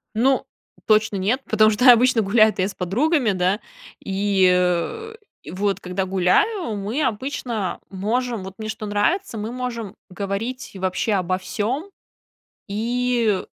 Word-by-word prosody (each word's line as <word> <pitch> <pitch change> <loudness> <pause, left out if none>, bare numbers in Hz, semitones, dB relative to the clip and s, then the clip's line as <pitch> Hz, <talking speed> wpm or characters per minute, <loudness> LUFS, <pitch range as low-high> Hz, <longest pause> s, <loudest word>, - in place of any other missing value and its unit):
Ну 260 +4 +2 0.4
точно 215 -1 +3
нет, 205 +8 0
потому 215 0 +5
что 250 +4 +7
обычно 245 0 +4
гуляю-то 215 -1 +3
я 190 - +2
с 205 - -8
подругами, 245 - +1
да? 185 +2 +1 0.4
И, 195 -1 +2
э, 180 - 0 0.4
вот 195 +2 -1
когда 185 +1 -3
гуляю, 200 - +1
мы 210 +9 -2
обычно 230 -5 -2
можем- 220 +3 -2
вот 190 0 -9
мне 215 0 -5
что 215 0 -5
нравится- 225 - 0
мы 215 +2 -4
можем 235 -4 -5
говорить 200 +7 -4
вообще 190 +3 -1
обо 185 -1 0
всём 240 - -3 0.8
и 235 -1 0
215 Hz, 130 wpm, -22 LUFS, 195-245 Hz, 0.8 s, что